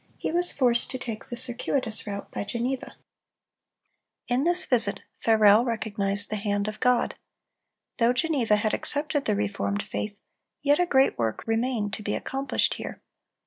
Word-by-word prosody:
he -, -, -3 dB
was 350 Hz, +1 st, +2 dB
forced 245 Hz, -3 st, +2 dB
to 260 Hz, -, -4 dB
take 230 Hz, -3 st, -6 dB
the 240 Hz, -, -5 dB
circuitous 245 Hz, -2 st, 0 dB
route 200 Hz, -1 st, -6 dB
by -, -, -3 dB
Geneva. 240 Hz, +5 st, -3 dB, 1.3 s
In 250 Hz, +4 st, +1 dB
this 350 Hz, +1 st, +5 dB
visit, 205 Hz, -5 st, +2 dB, 0.2 s
Farel 220 Hz, 0 st, +5 dB
recognized 205 Hz, -4 st, 0 dB
the 215 Hz, -, -1 dB
hand 205 Hz, 0 st, -1 dB
of 215 Hz, 0 st, -5 dB
God. 250 Hz, -1 st, +2 dB, 0.9 s
Though 235 Hz, 0 st, +4 dB
Geneva 250 Hz, -5 st, +1 dB
had 210 Hz, +1 st, 0 dB
accepted 290 Hz, -1 st, -1 dB
the 210 Hz, -, +1 dB
reformed 205 Hz, 0 st, -2 dB
faith, 205 Hz, -1 st, -5 dB, 0.4 s
yet 290 Hz, +2 st, +3 dB
a 355 Hz, -, +2 dB
great 270 Hz, -, +3 dB
work 110 Hz, -2 st, -1 dB
remained 225 Hz, -2 st, -1 dB
to 215 Hz, -, -4 dB
be 205 Hz, 0 st, -2 dB
accomplished 270 Hz, +1 st, -1 dB
here. -, -, -7 dB
230 Hz, 155 wpm, -26 LUFS, 205-260 Hz, 1.3 s, this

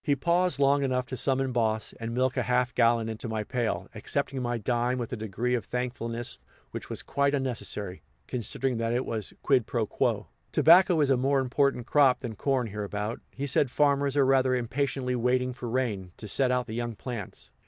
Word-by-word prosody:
He 145 Hz, -, +2 dB
paused 170 Hz, +2 st, +1 dB
long 140 Hz, 0 st, +3 dB
enough 130 Hz, -2 st, 0 dB
to 130 Hz, -, -5 dB
summon 135 Hz, +1 st, +1 dB
Boss 110 Hz, -2 st, 0 dB
and 115 Hz, 0 st, -4 dB
milk 130 Hz, +1 st, +1 dB
a -, -, +1 dB
half 125 Hz, -1 st, +1 dB
gallon 115 Hz, -1 st, +3 dB
into 115 Hz, +1 st, -4 dB
my 110 Hz, -1 st, -2 dB
pail, 120 Hz, +1 st, -2 dB
accepting 135 Hz, -1 st, -3 dB
my 120 Hz, -1 st, -1 dB
dime 120 Hz, +3 st, 0 dB
with 120 Hz, -2 st, -4 dB
a -, -, 0 dB
degree 110 Hz, +3 st, -2 dB
of 120 Hz, -4 st, 0 dB
thankfulness 120 Hz, 0 st, -4 dB, 0.3 s
which -, -, -7 dB
was -, -, -4 dB
quite 140 Hz, +1 st, +1 dB
unnecessary, 115 Hz, -8 st, -3 dB, 0.2 s
considering 125 Hz, +1 st, -2 dB
that 115 Hz, 0 st, -1 dB
it 125 Hz, +2 st, 0 dB
was 110 Hz, -4 st, -3 dB
quid 130 Hz, -5 st, +3 dB
pro 115 Hz, -3 st, 0 dB
quo. -, -, 0 dB, 0.3 s
Tobacco 175 Hz, +1 st, +6 dB
is 140 Hz, -2 st, +3 dB
a 130 Hz, -, +4 dB
more 135 Hz, +2 st, +2 dB
important 130 Hz, -1 st, +1 dB
crop 135 Hz, -2 st, +4 dB
than 120 Hz, -4 st, -4 dB
corn 130 Hz, +3 st, 0 dB
hereabout, 105 Hz, +2 st, -4 dB
he 140 Hz, -, -5 dB
said; 135 Hz, 0 st, +2 dB
farmers 140 Hz, +1 st, +2 dB
are 140 Hz, -, +5 dB
rather 130 Hz, -1 st, +3 dB
impatiently 125 Hz, +1 st, -1 dB
waiting 125 Hz, +1 st, +1 dB
for 120 Hz, -1 st, -6 dB
rain, 110 Hz, -8 st, -2 dB
to 110 Hz, -, -8 dB
set 130 Hz, +5 st, +2 dB
out 125 Hz, 0 st, +1 dB
the 110 Hz, -, -7 dB
young 120 Hz, 0 st, -3 dB
plants. 115 Hz, -4 st, -7 dB
125 Hz, 195 wpm, -28 LUFS, 115-135 Hz, 0.3 s, Tobacco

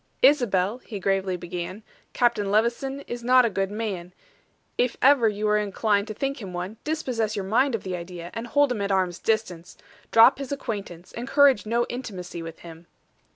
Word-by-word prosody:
"Isabel," 240 Hz, -6 st, +3 dB
he 215 Hz, -5 st, -8 dB
gravely 190 Hz, -1 st, 0 dB
began, 180 Hz, +4 st, -6 dB, 0.3 s
"Captain 235 Hz, -5 st, +1 dB
Levison 235 Hz, +6 st, 0 dB
is 240 Hz, -3 st, -7 dB
not 250 Hz, +1 st, +5 dB
a 230 Hz, -, 0 dB
good 195 Hz, 0 st, -1 dB
man; 200 Hz, -5 st, -4 dB, 0.6 s
if 245 Hz, -1 st, 0 dB
ever 260 Hz, -4 st, +5 dB
you 210 Hz, 0 st, -3 dB
were 210 Hz, 0 st, +3 dB
inclined 205 Hz, 0 st, 0 dB
to 215 Hz, -, -5 dB
think 275 Hz, +2 st, -3 dB
him 190 Hz, -3 st, -7 dB
one, 180 Hz, +5 st, -5 dB
dispossess 250 Hz, -9 st, -2 dB
your 195 Hz, -, -3 dB
mind 245 Hz, +6 st, +2 dB
of 220 Hz, -, -5 dB
the 185 Hz, -1 st, -3 dB
idea, 175 Hz, 0 st, -8 dB
and 230 Hz, +1 st, -5 dB
hold 285 Hz, +2 st, +3 dB
him 225 Hz, -4 st, -2 dB
at 200 Hz, 0 st, -1 dB
arm's 185 Hz, -2 st, 0 dB
distance. 185 Hz, -6 st, -2 dB, 0.3 s
Drop 230 Hz, +5 st, +6 dB
his 275 Hz, -1 st, -6 dB
acquaintance 200 Hz, -10 st, -5 dB
encourage 270 Hz, -1 st, +3 dB
no 235 Hz, +2 st, +1 dB
intimacy 190 Hz, -9 st, -6 dB
with 165 Hz, 0 st, -9 dB
him." 170 Hz, 0 st, -12 dB
215 Hz, 180 wpm, -25 LUFS, 185-245 Hz, 0.6 s, Drop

